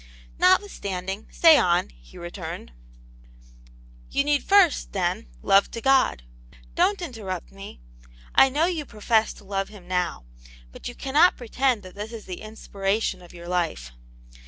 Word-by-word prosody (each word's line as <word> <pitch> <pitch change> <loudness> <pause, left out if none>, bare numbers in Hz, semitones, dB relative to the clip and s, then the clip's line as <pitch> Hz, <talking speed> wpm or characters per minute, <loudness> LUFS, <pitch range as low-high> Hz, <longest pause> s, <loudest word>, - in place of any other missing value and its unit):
" - - -24
Notwithstanding, 205 - 0
say 325 -2 +6
on," 175 0 +2
he - - -18
returned.. 175 - -7 1.4
You 280 - +1
need 290 0 +1
first, 390 -5 +3
then, 185 +3 -1 0.2
love 195 0 +4
to 230 - -6
God. 265 - +2 0.5
Don't 400 -2 +1
inter 245 -10 -7
rupt 185 -3 -5
me; 195 - -11 0.5
I 270 - +6
know 295 +5 +1
you 340 -4 -2
profess 220 -2 +1
to - - -16
love 195 0 -3
Him 200 -4 -14
now. 180 - -2 0.5
But - - -9
you 245 - -7
cannot 295 +7 +3
pretend 245 -1 0
that 185 -1 -11
this 210 +2 -7
is 225 -2 -8
the 180 -2 -7
inspiration 210 -2 -2
of 175 - -14
your 170 0 -11
life." 170 - -2
205 Hz, 155 wpm, -25 LUFS, 180-270 Hz, 1.4 s, say